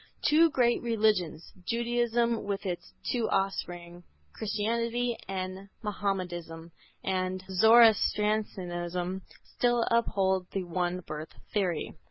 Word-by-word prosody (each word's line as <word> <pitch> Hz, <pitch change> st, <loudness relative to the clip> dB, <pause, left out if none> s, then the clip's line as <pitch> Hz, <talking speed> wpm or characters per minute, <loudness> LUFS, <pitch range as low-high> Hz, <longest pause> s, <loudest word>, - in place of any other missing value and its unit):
Two 325 Hz, +3 st, +6 dB
great 240 Hz, -4 st, +2 dB
religions, 210 Hz, -9 st, 0 dB
Judaism 235 Hz, +1 st, 0 dB
with 200 Hz, 0 st, -3 dB
its 180 Hz, -2 st, -4 dB, 0.2 s
two 235 Hz, -3 st, 0 dB
offspring 175 Hz, -3 st, -2 dB, 0.3 s
Christianity 230 Hz, +3 st, -1 dB
and 190 Hz, +1 st, -5 dB
Mahomedanism 175 Hz, -5 st, -3 dB, 0.3 s
and 185 Hz, 0 st, -1 dB
Zoroastrianism, 190 Hz, -4 st, +3 dB, 0.2 s
still 240 Hz, -1 st, +1 dB
uphold 190 Hz, -5 st, +2 dB
the 195 Hz, -, -1 dB
one 180 Hz, +1 st, -2 dB
birth 155 Hz, -1 st, -7 dB, 0.2 s
theory. 185 Hz, -6 st, 0 dB
195 Hz, 95 wpm, -29 LUFS, 180-230 Hz, 0.3 s, Two